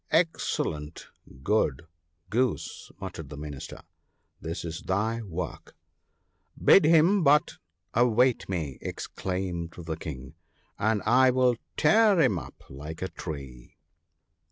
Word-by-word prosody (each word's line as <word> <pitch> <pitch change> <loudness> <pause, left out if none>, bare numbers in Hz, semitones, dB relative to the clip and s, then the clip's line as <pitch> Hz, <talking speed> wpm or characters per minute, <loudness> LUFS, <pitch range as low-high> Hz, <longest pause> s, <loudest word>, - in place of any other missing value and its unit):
* - - -44
Excellent 85 - -1 0.3
good, 80 -7 +1 0.5
Goose! 125 +1 -1
' - - -38
muttered 80 -4 -7
the 75 - -8
Minister. 75 -2 -8 0.3
' - - -44
This 80 +2 -5
is 80 0 -5
thy 110 +5 -1
work! 90 -5 -6 0.3
' - - -48
* - - -40
Bid 195 - +8
him 170 +4 +5
but 150 +1 +4 0.4
await 120 0 +3
me! 80 -8 -3
' - - -38
exclaimed 90 -3 -4
the 85 -2 -4
King, 65 -4 -7 0.2
* - - -38
and 110 -2 0
I 130 +4 +5
will 125 -1 +3 0.2
tear 215 -4 +5
him 120 - +3
up - - -12
like 75 +6 -8
a 95 - -2
tree 70 -8 -8
95 Hz, 140 wpm, -27 LUFS, 80-125 Hz, 0.5 s, Bid